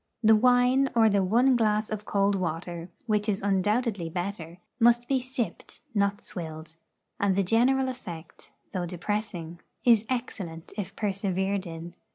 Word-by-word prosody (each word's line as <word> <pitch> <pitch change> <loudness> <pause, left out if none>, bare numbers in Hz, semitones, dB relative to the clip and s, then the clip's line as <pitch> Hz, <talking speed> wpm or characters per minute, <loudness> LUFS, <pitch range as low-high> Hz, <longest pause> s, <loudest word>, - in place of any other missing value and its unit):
The 220 0 +7
wine 250 +3 +4
or 225 -1 +6
the 200 -1 +2
one 245 +7 +4
glass 215 -2 +1
of 210 -1 -4
cold 200 0 +2
water, 170 -1 -3 0.2
which 210 -2 +1
is 200 -1 +1
undoubtedly 205 -1 +1
better, 175 -1 -5 0.2
must 240 +1 +4
be 270 -1 +2
sipped, 255 -1 -5
not 200 -1 +1
swilled; 160 -2 -8 0.4
and 200 -2 +2
the 200 - +2
general 250 +7 +3
effect, 180 -11 -8 0.2
though 180 -2 -2
depressing, 175 -2 -4 0.3
is 230 -3 +6
excellent 190 -10 -4
if 200 -1 -5
persevered 195 -1 -1
in. 165 +1 -8
200 Hz, 145 wpm, -27 LUFS, 180-230 Hz, 0.4 s, The